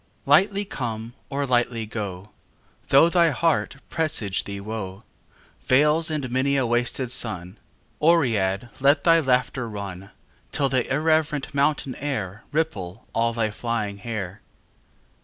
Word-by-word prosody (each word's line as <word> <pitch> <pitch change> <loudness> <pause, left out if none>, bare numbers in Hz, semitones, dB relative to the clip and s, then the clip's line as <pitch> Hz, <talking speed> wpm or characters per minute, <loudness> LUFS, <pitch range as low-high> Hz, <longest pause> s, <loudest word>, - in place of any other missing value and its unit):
XXV - - -27
Lightly 195 +7 +4
come 115 - -5 0.2
or 140 0 -1
lightly 120 -3 +1
go: 105 -2 -6 0.6
Though 140 +4 +6
thy 170 -1 +4
heart 160 0 +1
presage 155 - -1
thee 100 0 -5
woe, 100 -1 -6 0.6
Vales 150 +5 +4
and 145 -5 -3
many 135 +2 +1
a 130 - +2
wasted 120 +1 0
sun, 95 -6 -1 0.4
Oread 120 - +2
let 140 +2 +4
thy 165 -1 +6
laughter 125 -3 0
run, 100 -2 -7 0.4
Till 140 -1 +1
the 130 -1 0
irreverent 150 -1 +1
mountain 140 -1 +1
air 110 -8 -4
Ripple 115 - -2
all 115 +1 +2
thy 110 -2 0
flying 105 -2 -3
hair. 105 -3 -5
125 Hz, 130 wpm, -24 LUFS, 105-145 Hz, 0.6 s, Though